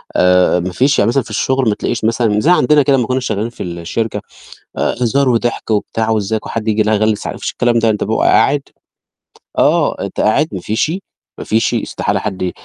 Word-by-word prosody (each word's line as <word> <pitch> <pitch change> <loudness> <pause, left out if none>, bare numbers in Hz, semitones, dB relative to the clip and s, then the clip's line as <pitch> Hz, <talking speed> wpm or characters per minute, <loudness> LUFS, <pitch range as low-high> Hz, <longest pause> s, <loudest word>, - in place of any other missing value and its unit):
آآ 90 0 +4
ما 90 +1 -3
فيش. 135 +9 +2
يعني 100 - +3
مثلًا 130 +1 +1
في - - -14
الشُغل 130 +3 0
ما 105 - 0
تلاقيش 115 -2 -3
مثلًا 110 -2 +1
زي 165 +10 +3
عندنا 150 -3 +4
كده 140 -1 +3
لمّا 120 - 0
كُنّا 130 0 0
شغّالين 110 -2 -2
في - - -8
الشركة، 90 +5 -4 0.6
آآ، - - 0
هزار 130 +3 +2
وضحك 120 -1 -1
وبتاع 110 +1 -1
وإزّيك 110 0 -1
وحد 115 -1 -4
ييجي 110 0 +2
لأ 110 +1 +1
هاغلّس 110 0 0
ع - - -3
ما - - -8
فيش - - -4
الكلام 120 -1 +1
ده، 115 0 +2
أنت 105 - 0
ببيقى 110 +2 -1
قاعد 145 0 +3 1.0
آه، - - +2
أنت - - -5
قاعد 145 +9 +2
ما 95 - -4
فيش، 110 - -1 0.5
ما - - -5
فيش، 110 0 +1
استحالة - - -2
حد 95 -3 -3
110 Hz, 210 wpm, -16 LUFS, 105-125 Hz, 1.0 s, آآ